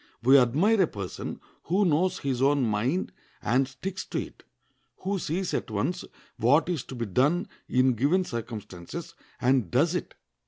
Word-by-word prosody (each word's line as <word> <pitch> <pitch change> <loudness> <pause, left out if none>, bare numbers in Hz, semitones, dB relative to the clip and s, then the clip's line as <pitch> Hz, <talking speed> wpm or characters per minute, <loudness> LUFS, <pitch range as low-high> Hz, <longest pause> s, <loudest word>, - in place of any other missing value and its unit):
We 130 +3 +7
admire 165 - +3
a 180 - +4
person 100 -7 -6 0.3
who 190 +6 +2
knows 175 +3 +2
his 130 -3 -2
own 140 0 +3
mind 120 - 0 0.3
and 130 +4 +2
sticks 185 +8 -5
to - - -4
it, - - -8 0.6
who 195 +1 -1
sees 175 +3 -2
at - - -2
once 135 - -1 0.3
what 145 +9 +3
is 170 -7 -1
to 130 - -8
be 120 -1 -2
done 145 - +2 0.2
in 130 0 +3
given 145 - +2
circumstances, 110 - -6 0.3
and 125 -6 +2
does 155 - +2
it. 180 - -4
135 Hz, 160 wpm, -27 LUFS, 120-180 Hz, 0.6 s, We